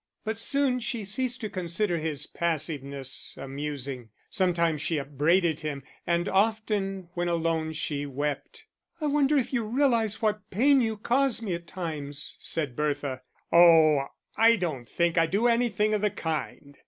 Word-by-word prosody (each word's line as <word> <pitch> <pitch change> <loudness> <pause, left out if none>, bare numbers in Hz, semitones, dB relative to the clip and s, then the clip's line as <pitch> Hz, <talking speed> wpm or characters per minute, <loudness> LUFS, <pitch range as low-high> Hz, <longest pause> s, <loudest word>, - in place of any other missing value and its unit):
But 220 0 -3
soon 270 +1 +1
she 235 -3 -3
ceased 250 +5 0
to 215 - -3
consider 175 0 -1
his 150 -2 -2
passiveness 140 -5 -3
amusing, 135 -3 -5 0.2
sometimes 170 -5 +1
she 160 0 -1
upbraided 150 +4 +1
him, 150 -3 -5 0.2
and 170 0 +1
often, 195 -3 0
when 175 -1 -1
alone, 165 -2 0
she 145 -2 -3
wept. 145 +1 -4 0.3
"I 310 - -2
wonder 295 0 +3
if 265 -1 -1
you 240 -3 +1
realise 230 -2 +1
what 210 -2 -1
pain 270 +7 +4
you 220 -2 -1
cause 245 +2 +1
me 195 -5 -2
at 170 0 -6
times," 150 -5 -4
said 145 -7 -1
Bertha. 145 -3 -2 0.3
"Oh, 160 -4 +6 0.3
I 230 +1 +6
don't 150 - -4
think 170 0 +1
I 165 - +3
do 200 +8 0
anything 230 -3 +2
of 210 - +1
the 210 - +2
kind." 155 -5 -5
170 Hz, 155 wpm, -27 LUFS, 150-220 Hz, 0.3 s, Oh